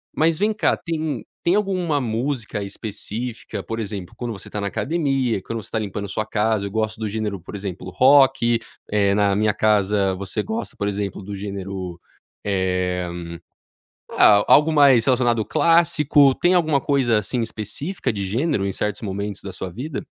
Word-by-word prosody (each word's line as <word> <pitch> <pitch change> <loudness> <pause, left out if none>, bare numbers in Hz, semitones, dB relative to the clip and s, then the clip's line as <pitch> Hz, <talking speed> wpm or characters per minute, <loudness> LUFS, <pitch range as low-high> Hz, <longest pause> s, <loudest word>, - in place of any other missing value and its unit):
Mas 160 +1 +2
vem 210 +2 +2
cá, 210 - +2
tem 160 -3 -3 0.2
tem 175 - +2
alguma 185 -8 0
música 115 -2 -2
específica, 110 +3 -5
por 115 0 -5
exemplo, 100 -4 -5
quando 120 -2 -4
você 100 - -9
tá 105 - -4
na 100 - -2
academia, 135 - 0
quando 115 +3 -5
você - - -11
tá 110 - 0
limpando 100 -1 -4
sua 110 +3 -2
casa, 110 -1 0
eu - - -8
gosto 110 0 -2
do 110 -1 -2
gênero, 105 -2 -3
por 95 - -9
exemplo, 95 -2 -6
rock, 130 +1 +5 0.3
eh, 100 -1 +2
na 100 -1 +2
minha 105 0 +2
casa, 100 -2 +2
você 95 0 -3
gosta, 220 +1 -4
por 100 - -2
exemplo, 100 -1 -3
do 100 +2 -7
gênero, 95 -3 -6 0.5
eh, 90 -2 0 1.1
ah, 105 -1 +6
algo 150 +2 +6
mais 140 -6 +6
relacionado 120 -3 +2
ao - - -1
clássico. 150 - +4
Tem 175 +1 +3
alguma 155 -5 +3
coisa, 130 -5 +2
assim, 120 +3 -2
específica 120 - -3
de 100 -2 -3
gênero 110 - 0
em 100 - -1
certos 105 +3 -3
momentos 100 0 -4
da 100 - -7
sua 95 0 -6
vida? 130 - -5
110 Hz, 175 wpm, -22 LUFS, 100-135 Hz, 1.1 s, ah